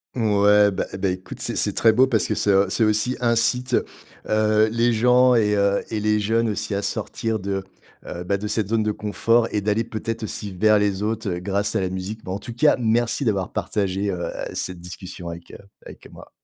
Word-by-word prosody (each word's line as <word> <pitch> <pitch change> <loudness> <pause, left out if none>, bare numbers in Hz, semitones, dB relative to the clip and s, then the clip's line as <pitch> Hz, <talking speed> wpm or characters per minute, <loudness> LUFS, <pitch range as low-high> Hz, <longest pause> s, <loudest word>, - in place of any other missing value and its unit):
Ouais. 105 -2 +4
Ben, - - -2
eh, 95 - -4
ben 95 -1 0
écoute, 95 0 -9
c'est - - -3
c'est - - 0
très 110 -1 +4
beau 130 +4 +5
parce 120 -5 +1
que - - -1
c'est, 105 - 0
heu, 95 0 +3
ça 105 +4 +1
aussi, 110 +4 +1
incite, 120 +2 +2 0.5
heu, 110 0 +3
les 115 +1 +1
gens 125 +2 +4
et 105 -2 +2
heu, 100 0 +2
et 110 -2 -3
les 105 0 +2
jeunes 115 +2 +1
aussi 105 0 -2
à 100 - -1
sortir 110 +2 -2
de, 95 0 -3 0.4
heu, 90 - -6
bah, 100 +2 0
de 105 - -6
cette 105 -2 -1
zone 110 0 +1
de 105 - 0
confort 115 +3 +1
et 105 - -1
d'aller 105 +2 0
peut-être 115 0 -5
aussi 105 -1 -4
vers 105 +3 +3
les 100 -1 0
autres, 110 0 -2
heu, 90 -1 -3
grâce 100 +2 -1
à - - 0
la 95 - -1
musique. 95 +4 -5
Mais 90 - -5
en 95 - -3
tout 120 +2 -8
cas, 145 +6 +4
merci 120 +3 0
d'avoir 100 -5 -1
partagé, 100 0 -1
heu, 85 -2 -4 0.2
cette 90 -2 -4
discussion 90 0 -8
avec, 85 0 -10
heu - - -9 0.3
avec - - -13
moi. - - -14
105 Hz, 225 wpm, -22 LUFS, 100-115 Hz, 0.5 s, beau